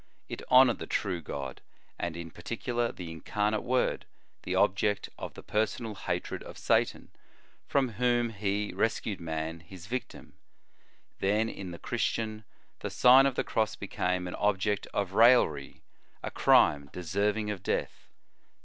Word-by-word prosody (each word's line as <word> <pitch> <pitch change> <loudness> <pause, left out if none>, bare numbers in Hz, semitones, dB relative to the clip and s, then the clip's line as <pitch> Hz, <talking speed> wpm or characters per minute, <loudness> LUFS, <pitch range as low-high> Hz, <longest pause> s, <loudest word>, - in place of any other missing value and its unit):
It - - -6
honored 125 -1 +6
the - - -6
true 90 -4 -1
God, 70 -3 -6 0.4
and, 85 -1 -3
in 85 -1 -7
particular, 120 +6 -2
the 85 -3 -8
Incarnate 105 +6 -1
Word, 125 +1 0 0.3
the - - -3
object 100 +2 +2
of - - -6
the - - -10
personal 110 +1 -1
hatred 100 - -3
of - - -10
Satan, - - +1 0.6
from 135 -3 +2
whom 120 +1 +1
He. 105 0 -2
rescued 110 -3 -1
man, 80 0 -3
his 85 +2 -12
victim; 125 +5 -6 0.9
then 105 +3 +2
in 95 -4 -7
the 85 - -7
Christian, 110 +2 -2 0.3
the - - -4
Sign 130 +2 +7
of 135 - -2
the - - 0
Cross 110 -1 0
became 90 -2 -2
an 90 - -5
object 105 0 0
of 100 -2 -2
raillery, 120 +4 +4 0.4
a - - -3
crime 70 -1 +4
deserving 100 +5 -1
of 100 -3 -5
death. - - -3
105 Hz, 145 wpm, -29 LUFS, 90-115 Hz, 0.9 s, Sign